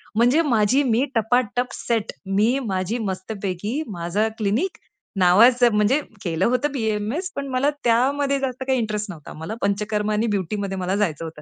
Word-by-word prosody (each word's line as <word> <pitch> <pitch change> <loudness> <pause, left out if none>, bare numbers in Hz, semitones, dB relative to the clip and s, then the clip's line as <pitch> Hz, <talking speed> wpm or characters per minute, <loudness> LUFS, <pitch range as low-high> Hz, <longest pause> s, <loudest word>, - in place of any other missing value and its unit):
म्हणजे 245 +8 +4
माझी 230 +6 +3
मी 245 0 +2
टपाटप 245 +1 +1
सेट, 230 -3 -2 0.2
मी 230 +6 +3
माझी 190 +4 -1
मस्तपैकी 200 - -4
माझं 180 +4 -1
क्लिनिक, 220 - 0 0.4
नावाचं 230 +6 +5
म्हणजे 215 +8 +3 0.2
केलं 165 -3 0
होतं 255 +4 +1
बी-ए-एम-एस, 225 - -2
पण 280 0 -4
मला 270 +3 +3
त्यामध्ये 275 +4 +2
जास्त 260 -1 -3
काही 260 -2 +2
इंटरेस्ट 210 -2 -2
नव्हता. 155 -5 -10
मला 160 +7 -6
पंचकर्म 210 +1 0
आणि 215 +2 +1
ब्युटीमध्ये 195 +1 -3
मला 185 +2 -1
जायचं 165 -6 -1
होतं. 160 -2 -9
220 Hz, 150 wpm, -22 LUFS, 200-250 Hz, 0.4 s, नावाचं